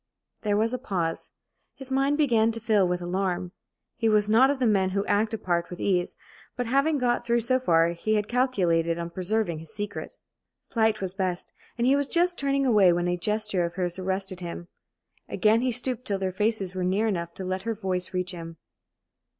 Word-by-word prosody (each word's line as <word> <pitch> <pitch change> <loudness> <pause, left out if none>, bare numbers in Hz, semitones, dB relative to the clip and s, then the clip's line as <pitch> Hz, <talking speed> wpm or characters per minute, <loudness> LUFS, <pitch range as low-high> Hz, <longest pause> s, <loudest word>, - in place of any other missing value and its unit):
There 205 -1 +1
was 225 +3 +1
a 255 - -2
pause. 175 -9 -3 0.5
His 270 -1 -9
mind 275 +2 +2
began 230 -7 +3
to 230 - -4
fill 215 -4 +2
with 180 0 -2
alarm. 180 0 -2 0.5
He 225 -1 +1
was 210 -1 +2
not 255 +5 +6
of 285 - 0
the 260 - 0
men 195 -4 +3
who 200 - 0
act 210 +2 +1
a 225 - -2
part 175 -4 -1
with 180 - -8
ease; 180 -3 0 0.4
but, 245 - -1
having 275 +6 +2
got 245 -2 +1
through 235 0 +1
so 255 +3 +1
far, 165 -8 +3
he 175 +6 -1
had 210 -1 0
calculated 180 -10 +1
on 170 0 -5
preserving 185 -2 -1
his 160 - -11
secret. 205 -1 -5 0.5
Flight 220 -2 +1
was 185 -1 -3
best, 185 -2 -3 0.2
and 235 - +1
he 265 +2 +5
was 285 -1 +1
just 350 +2 +1
turning 275 0 +1
away 210 -7 +5
when 175 0 0
a 175 - +1
gesture 210 0 0
of 170 +1 -3
hers 180 -1 -2
arrested 190 0 -2
him. 175 0 -7 0.6
Again 220 +1 +3
he 255 0 +1
stooped 250 0 -1
till 200 - 0
their 190 -1 -2
faces 205 -1 -1
were 185 -1 -3
near 190 +4 +1
enough 170 -5 -2
to 190 - -6
let 185 +1 -2
her 225 +3 -3
voice 185 -3 -2
reach 180 -1 -2
him. 165 -2 -8
205 Hz, 205 wpm, -26 LUFS, 180-235 Hz, 0.6 s, not